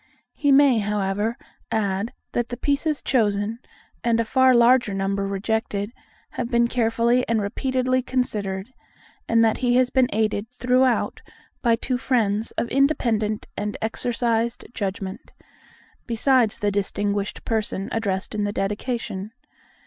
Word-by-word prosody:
He 285 -2 +1
may, 275 -4 +6
however, 210 +2 -1 0.3
add 200 0 0 0.2
that 240 0 -1
the 245 - -5
pieces 290 +3 0
chosen, 215 -2 +1 0.4
and 230 -1 +2
a 230 - +1
far 260 +2 +4
larger 240 -3 +4
number 195 0 -1
rejected, 205 +1 -2 0.4
have 240 - -3
been 235 -1 +3
carefully 235 +1 +2
and 230 -1 +2
repeatedly 255 +4 0
considered; 215 -4 -2 0.6
and 230 0 +5
that 220 - +1
he 245 -1 +2
has 255 0 +3
been 255 -2 +3
aided 215 0 0
throughout 250 0 +1 0.4
by 235 -2 +3
two 250 +2 -2
friends 225 -5 +1
of - - -1
independent 235 -6 +1
and 210 0 -3
exercised 230 +1 -1
judgment, 195 +1 -5 0.7
besides 240 -1 +2
the 205 -2 0
distinguished 200 0 -2
person 215 -3 -2
addressed 200 -4 -2
in 210 -1 -1
the 205 - 0
Dedication. 205 0 -3
225 Hz, 130 wpm, -23 LUFS, 205-250 Hz, 0.7 s, may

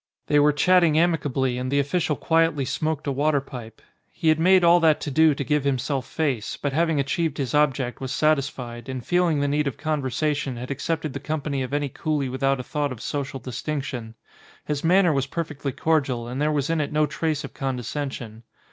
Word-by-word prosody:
They 145 - +3
were 150 +1 +5
chatting 165 +1 +4
amicably 140 -7 +1
and 130 0 -3
the 140 - +1
official 150 +2 0
quietly 165 -3 +1
smoked 155 +3 -2
a 140 - 0
water 145 +2 +2
pipe. 120 -5 -10 0.3
He 160 - 0
had 155 0 +3
made 185 +2 +5
all 170 +1 +6
that 160 -2 +4
to 145 - -3
do 155 +1 +4
to 140 - -3
give 150 +1 +1
himself 135 0 -1
face, 135 -9 -2
but 145 -2 -3
having 160 -1 +2
achieved 155 +2 -1
his 135 -4 -2
object 135 -4 +1
was 130 -1 -4
satisfied, 135 -5 -1
and 130 -2 -5
feeling 175 -2 +2
the 145 - +1
need 145 +1 +1
of 130 - -3
conversation 145 -2 -1
had 125 +3 -6
accepted 155 0 -2
the 140 - -4
company 145 -1 -3
of 130 - -4
any 145 0 0
coolie 145 -1 -2
without 135 +1 +1
a - - -4
thought 145 +1 -2
of 125 - -7
social 140 +1 -4
distinction. 125 -2 -5 0.5
His 150 -1 -2
manner 175 0 +4
was 135 -1 0
perfectly 150 -3 -4
cordial 135 -6 0
and 125 +4 -4
there 150 +1 +2
was 150 +1 0
in 165 -2 +1
it 145 - -3
no 150 0 +3
trace 155 0 -2
of 135 - -8
condescension. 130 -3 -4
145 Hz, 200 wpm, -24 LUFS, 130-155 Hz, 0.5 s, all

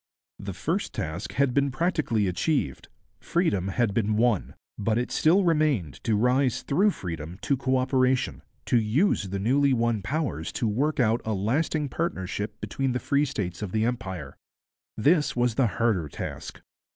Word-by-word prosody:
The - - -5
first - - -2
task 80 +2 -4
had 140 -2 +2
been 140 +1 +2
practically 135 - 0
achieved; 90 - -1 0.3
freedom 120 - 0
had 105 +1 0
been 105 -1 +1
won; 115 -3 +1 0.2
but 110 +2 +1
it 125 - -1
still 180 +6 +4
remained 150 - +1
to 110 - +2
rise 125 +2 +2
through 190 +9 +3
freedom 85 - -6
to 140 - +2
co 130 0 0
operation, 130 0 +1 0.2
to 120 - +3
use 110 - +1
the 100 - -3
newly 135 +7 +3
won 115 -3 +1
powers 120 - -2
to 115 - -1
work 140 +9 0
out 115 -1 +2
a 110 - -1
lasting 145 +9 0
partnership 105 - -3
between 135 -2 -2
the 125 - -1
free 140 +2 +1
states 95 - -4
of 100 -4 -4
the 110 0 +2
Empire. 110 -7 -4 0.6
This 150 +7 +3
was 120 -1 +2
the 125 +2 +2
harder 105 -7 0
task. - - -7
120 Hz, 165 wpm, -26 LUFS, 105-140 Hz, 0.6 s, still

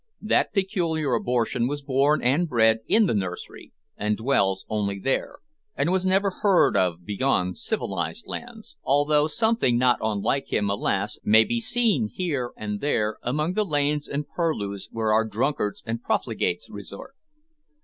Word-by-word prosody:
That 215 - +1
peculiar 175 - 0
abortion 120 0 0
was 145 +1 -4
born 140 +2 +2
and 145 +8 +2
bred 110 -3 +4
in 220 0 +4
the 180 - +1
nursery, 95 -4 -5 0.2
and 105 0 -1
dwells 100 -6 +1
only 100 -2 -2
there, 135 - -2 0.4
and 170 - 0
was 190 0 +1
never 195 +1 +2
heard 200 -4 +4
of 90 -2 0
beyond 95 -4 0
civilised - - -3
lands 105 - -9
although 145 +2 +2
something 220 - +1
not 125 0 +3
unlike 110 +5 -1
him, 100 -1 +1
alas! 100 +1 -1
may 110 +1 +6
be 235 - -1
seen 225 - +1
here 145 -9 -2
and 105 -1 -4
there 110 -7 0
among 150 +7 -1
the 215 - +1
lanes 145 -4 0
and 145 0 -3
purlieus 105 - -3
where 110 -1 0
our 110 +1 +4
drunkards 110 0 -2
and 115 +1 -3
profligates 110 -4 -1
resort. 100 - -10
125 Hz, 150 wpm, -25 LUFS, 105-155 Hz, 0.4 s, may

